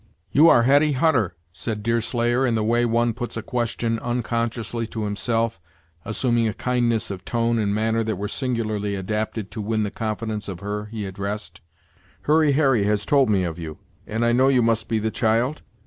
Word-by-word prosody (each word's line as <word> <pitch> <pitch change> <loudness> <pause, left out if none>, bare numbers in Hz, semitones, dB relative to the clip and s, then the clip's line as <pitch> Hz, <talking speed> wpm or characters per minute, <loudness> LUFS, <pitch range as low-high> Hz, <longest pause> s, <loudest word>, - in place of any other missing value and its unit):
"You 160 +4 +6
are 120 - +6
Hetty 145 +4 +4
Hutter," 130 - +2 0.2
said 105 +3 -5
Deerslayer, 120 +2 +1
in 120 -3 +2
the 110 - 0
way 120 +2 +2
one 115 0 +1
puts 120 0 -5
a 115 - -4
question 115 -1 -1
unconsciously 115 -1 -2
to 110 -1 -4
himself, 115 0 -1 0.5
assuming 120 +1 +1
a 110 - -2
kindness 120 -4 0
of 95 -2 -6
tone 115 -1 0
and 105 -2 0
manner 110 +2 +1
that 110 - -1
were 100 +2 -3
singularly 110 -4 -2
adapted 105 +1 -3
to 110 - -5
win 110 +1 0
the 105 - -2
confidence 110 -1 -3
of 95 -3 -6
her 105 +1 -3
he 105 -1 -5
addressed. 100 -1 -5 0.6
"Hurry 155 -1 +4
Harry 135 -8 +3
has 105 0 0
told 140 -4 +3
me 100 -3 +2
of 85 -1 -4
you, 80 -2 -6 0.3
and 115 +2 -1
I 120 - +3
know 130 +3 +4
you 130 -3 +4
must 115 -1 +1
be 115 - 0
the 110 +1 -1
child?" 115 +7 +1
115 Hz, 190 wpm, -23 LUFS, 105-120 Hz, 0.6 s, You